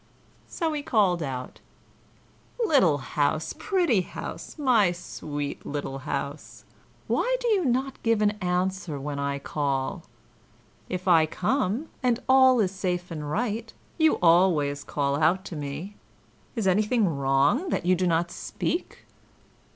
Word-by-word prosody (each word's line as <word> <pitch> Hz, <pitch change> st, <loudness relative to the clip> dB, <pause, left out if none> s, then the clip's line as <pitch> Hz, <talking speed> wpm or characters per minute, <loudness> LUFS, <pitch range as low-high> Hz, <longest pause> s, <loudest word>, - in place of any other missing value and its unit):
So 325 Hz, -2 st, -2 dB
he 295 Hz, -, -2 dB
called 200 Hz, -10 st, +2 dB
out: 130 Hz, -4 st, -5 dB, 1.1 s
"Little 190 Hz, -, +4 dB
house, 145 Hz, +2 st, -1 dB
pretty 325 Hz, -, +1 dB
house, 180 Hz, -, -8 dB
my 240 Hz, -, +3 dB
sweet 145 Hz, -4 st, -6 dB
little 140 Hz, -2 st, -4 dB
house, 140 Hz, +1 st, -5 dB, 0.4 s
why -, -, +1 dB
do -, -, -2 dB
you 405 Hz, -5 st, +3 dB
not 260 Hz, +1 st, -1 dB
give 230 Hz, -2 st, +2 dB
an 205 Hz, -, +4 dB
answer 180 Hz, -3 st, -1 dB
when 140 Hz, +1 st, -4 dB
I 140 Hz, 0 st, -1 dB
call? 140 Hz, +4 st, -2 dB, 0.9 s
If 185 Hz, +1 st, -4 dB
I 165 Hz, -3 st, +5 dB
come, 245 Hz, -, -1 dB
and 245 Hz, -2 st, +2 dB
all 260 Hz, -1 st, +6 dB
is 195 Hz, -4 st, +2 dB
safe 180 Hz, -2 st, -3 dB
and 150 Hz, -3 st, -5 dB
right, 225 Hz, +4 st, -2 dB, 0.3 s
you 315 Hz, -1 st, +5 dB
always 165 Hz, -5 st, +4 dB
call 140 Hz, -1 st, -1 dB
out 170 Hz, +5 st, +2 dB
to 170 Hz, -, -7 dB
me. 150 Hz, +7 st, -6 dB, 0.6 s
Is 225 Hz, -4 st, -1 dB
anything 210 Hz, +3 st, +2 dB
wrong, 140 Hz, -, +2 dB
that -, -, -1 dB
you 185 Hz, -, +4 dB
do 180 Hz, 0 st, +1 dB
not 170 Hz, +1 st, +1 dB
speak?" 345 Hz, -, -4 dB
180 Hz, 135 wpm, -26 LUFS, 150-235 Hz, 1.1 s, all